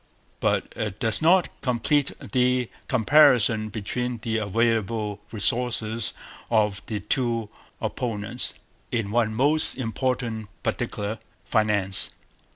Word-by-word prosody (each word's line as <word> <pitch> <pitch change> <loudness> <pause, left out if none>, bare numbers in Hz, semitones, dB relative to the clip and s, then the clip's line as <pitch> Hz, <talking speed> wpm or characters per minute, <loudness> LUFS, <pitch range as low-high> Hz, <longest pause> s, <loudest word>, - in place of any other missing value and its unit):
But - - 0
it 105 -1 -4
does 110 -4 +4
not 175 +3 +5
complete 130 +3 +1
the 125 -1 +1 0.2
comparison 125 -4 +4
between 120 +4 -3
the 110 -1 0
available 110 -1 0
resources 115 0 -1 0.3
of 105 -3 +2
the 105 -2 -3
two 115 0 0 0.3
opponents 115 0 -3 0.4
in 110 -4 -1
one 110 -1 +1
most 145 +5 +3
important 120 -2 -2 0.2
particular 110 -2 -2 0.3
finance. 105 -4 +2
115 Hz, 100 wpm, -25 LUFS, 110-125 Hz, 0.4 s, not